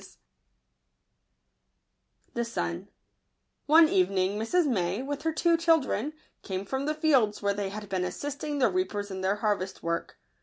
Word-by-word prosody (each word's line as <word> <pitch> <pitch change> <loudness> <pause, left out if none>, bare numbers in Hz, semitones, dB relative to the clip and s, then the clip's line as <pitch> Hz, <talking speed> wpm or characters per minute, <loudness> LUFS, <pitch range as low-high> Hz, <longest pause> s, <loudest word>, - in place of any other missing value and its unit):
•8 - - -14
®j - - -16 2.2
it - - 0
Jbirn* 85 - -3 0.8
■ 320 +2 +8
NE - - -1
evening 190 +2 +2
Mrs. 335 +11 +2
May, 200 -3 0
with 285 +1 -4
her 320 - 0
two 335 +2 +3
children, 310 -5 +1 0.3
came 190 0 -4
from 265 +6 -3
the 305 - 0
fields, 270 -11 +2
where 200 0 +2
they 200 -1 -3
had 210 +1 -7
been 190 -2 -1
assisting 290 +10 -4
the 265 - +3
reapers 210 - -2
in 190 0 -5
their 190 +2 +1
harvest 205 -3 -2
work. 170 0 -3
215 Hz, 160 wpm, -28 LUFS, 195-295 Hz, 2.2 s, ■